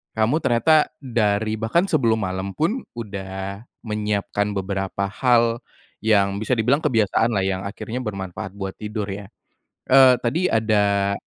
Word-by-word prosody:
kamu 110 +8 +2
ternyata, 150 +6 +3 0.2
dari, 110 -3 0
bahkan 115 +11 +2
sebelum 115 - +1
malam 95 +1 -4
pun, 205 - 0 0.2
udah 100 -2 -6 0.2
menyiapkan 105 -1 -1
beberapa 95 0 -2
hal 120 -1 +2 0.4
yang 100 -2 +2
bisa 110 - -4
dibilang 125 +6 +2
kebiasaan 115 -4 +2
lah 95 - +1
yang 95 -1 -1
akhirnya 110 +4 -5
bermanfaat 95 -5 -5
buat 95 -1 -5
tidur 105 -1 -4
ya? 100 0 -6 0.6
Eee, 130 -1 +7
tadi 155 +10 0
ada, 100 -3 +2
105 Hz, 135 wpm, -22 LUFS, 100-120 Hz, 0.6 s, Eee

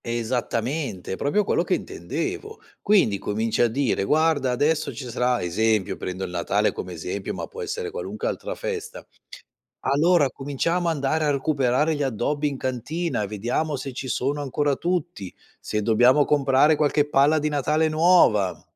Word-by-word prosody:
Esattamente, 120 - -2
è - - -1
proprio 145 - +1
quello - - +1
che - - +1
intendevo. 435 +1 -5 0.2
Quindi 185 - +3
cominci 110 +3 -1
a 120 - +5
dire: 120 -3 0
"Guarda 150 +2 +2
adesso 145 +5 +1
ci 130 - -7
sarà" 125 -2 0
esempio 105 +3 +1
prendo 95 +1 -5
il 90 - -5
Natale 85 -1 +1
come 90 - -7
esempio, 90 +4 -5
ma - - -4
può 465 - -9
essere 445 0 -4
qualunque 485 +1 -4
altra - - -4
festa. 470 0 -5 0.8
"Allora 150 +2 +3
cominciamo 165 +7 -1
andare 155 0 0
a - - +2
recuperare 140 +1 +1
gli 145 - -2
addobbi 140 +4 -1
in 140 - -5
cantina 130 +4 -2
e 100 - -3
vediamo 120 +9 -2
se 135 0 -6
ci 130 +1 -6
sono 140 +4 -1
ancora 145 +1 0
tutti, 170 - -3 0.3
se 105 - -2
dobbiamo 120 +6 +4
comprare 145 +1 +3
qualche 145 0 +1
palla 145 +2 +4
di 150 0 0
Natale 150 +2 +1
nuova." 155 - +3
140 Hz, 160 wpm, -24 LUFS, 115-160 Hz, 0.8 s, a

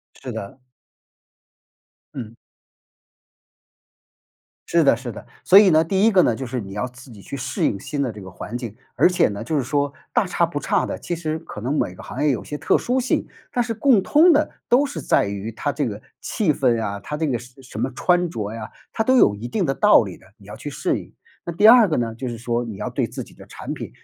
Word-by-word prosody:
是 125 - -7
的。 110 +3 -7 1.5
嗯。 115 -4 -7 2.3
是 170 -1 +3
的， 135 - +5
是 120 +1 -6
的。 110 - -10 0.2
所 190 - +8
以 205 -2 +7
呢， 160 -1 +5
第 190 +4 +1
一 225 - +4
个 185 - +6
呢， 120 - +2
就 130 +3 -5
是 125 0 -3
你 95 -2 -9
要 105 +5 -2
自 125 +2 -13
己 110 -4 -12
去 140 - -6
适 130 0 -2
应 100 - +1
新 145 +5 -3
的 125 -5 -1
这 105 - -10
个 95 -1 -10
环 105 +6 -7
境， 115 -4 -6 0.2
而 - - +5
且 180 - +3
呢， 100 -1 -5
就 155 - -2
是 140 - +1
说 140 +2 0 0.2
大 240 -5 +2
差 175 -1 +1
不 145 -3 -4
差 200 +2 +1
的。 - - -4
其 175 - -4
实 160 -1 -3
可 130 - -9
能 130 +7 -2
每 - - -1
个 - - -12
行 145 +4 -4
业 150 - +4
有 125 - -2
些 150 - -5
特 - - +2
殊 255 +2 0
性， 255 - 0 0.3
但 245 - +1
是 230 -1 -3
共 225 -2 +4
通 320 - +5
的 305 0 +3 0.2
都 270 +4 +4
是 170 - -6
在 - - +2
于 100 +2 -4
它 145 +6 -2
这 145 -3 -1
个 105 -2 -5 0.2
气 200 -9 0
氛 120 -5 +2
啊， 100 -1 -3
它 150 - -5
这 160 +1 -1
个 130 -5 0
什 125 +3 -15
什 130 - -8
么 130 - 0
穿 175 +1 +2
着 105 -7 -4
呀， 110 -1 -7 0.2
它 225 - 0
都 260 +4 +3
有 105 - +5
一 110 +4 -7
定 - - -1
的 135 - 0
道 - - +6
理 - - -8
的， - - -21
你 100 - -19
要 105 - -9
去 145 - -7
适 135 - -1
应。 - - -14 0.3
那 170 - -4
第 190 +6 +4
二 235 -3 +8
个 155 - 0
呢， 115 -2 -2
就 125 +3 -5
是 120 -1 -6
说 120 +1 -1
你 110 -4 -7
要 - - -4
对 - - -1
自 - - -6
己 - - -18
的 - - -14
产 - - -7
品 - - -6
135 Hz, 265 characters per minute, -22 LUFS, 115-175 Hz, 2.3 s, 所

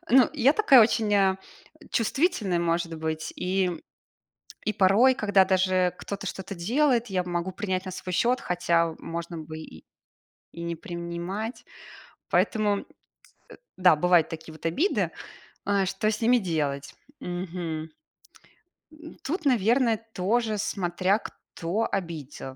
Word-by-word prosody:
Ну, 260 -1 +6
я 275 -2 +4
такая 310 - +6
очень, 215 -1 +1
э, 195 -1 +3 0.5
чувствительная, 225 - +1
может 170 -1 0
быть. 160 0 -3
И 185 0 0 1.0
и 215 - 0
порой, 210 +7 +5
когда 205 -6 +3
даже 185 -1 +2
кто-то 200 0 -6
что-то 190 +2 -6
делает, 240 - +1
я 185 -3 -1
могу 175 +1 -3
принять 190 -1 -3
на 185 - -5
свой 185 0 -6
счёт, 245 +7 +2
хотя, 170 -2 +1
можно 170 +1 -6
бы 155 0 -7
и 80 - -12 0.7
и 170 - -8
не 170 0 -3
принимать. 185 +7 -5 0.7
Поэтому 210 -3 +1 0.9
да, 180 -3 +6
бывают 175 +1 +3
такие 160 0 -8
вот 155 - -14
обиды. 290 - +1 0.5
Э, 200 -1 +2
что 195 +3 -1
с 215 - -4
ними 240 +2 +5
делать? 155 -8 -2 0.3
Мгм. 175 -3 -5 1.0
М, 310 +1 -12
тут, 330 +2 -3
наверно, 235 -1 +3 0.2
тоже 215 +3 0
смотря 190 0 0
кто 195 +4 -4
обидел. 155 -8 -5
185 Hz, 130 wpm, -26 LUFS, 170-220 Hz, 1.0 s, Ну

